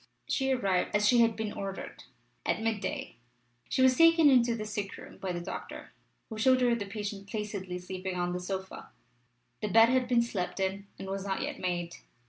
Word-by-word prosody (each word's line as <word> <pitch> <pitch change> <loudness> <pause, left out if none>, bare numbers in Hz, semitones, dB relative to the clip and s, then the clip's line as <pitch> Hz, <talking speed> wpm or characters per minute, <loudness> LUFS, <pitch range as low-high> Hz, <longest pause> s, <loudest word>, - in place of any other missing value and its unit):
She 270 -1 +1
arrived 195 -8 +1
as 210 0 +3
she 245 +1 +5
had 230 -1 +4
been 220 -2 -3
ordered, 195 -1 -6 0.4
at - - 0
midday: 220 - -3 0.5
she 260 - +2
was 260 0 +6
taken 330 -1 +6
into 240 -2 +4
the 215 -2 -4
sick 210 -2 -4
room - - -12
by 190 - -3
the 175 - -3
doctor, 175 - -7 0.3
who 220 -2 -7
showed 255 +3 +4
her 245 -1 +4
the 210 -4 -2
patient 200 -1 -5
placidly 200 -4 -4
sleeping 185 +1 -5
on 175 0 -1
a - - -2
sofa: 190 +1 -6 0.7
the 210 - -1
bed 225 +3 +6
had 255 0 +2
been 240 -1 +3
slept 195 -6 -3
in, 195 +1 -2
and 195 - -7
was 195 0 -3
not 195 +3 -2
yet 285 0 -4
made. 175 -2 -2
210 Hz, 195 wpm, -30 LUFS, 190-235 Hz, 0.7 s, was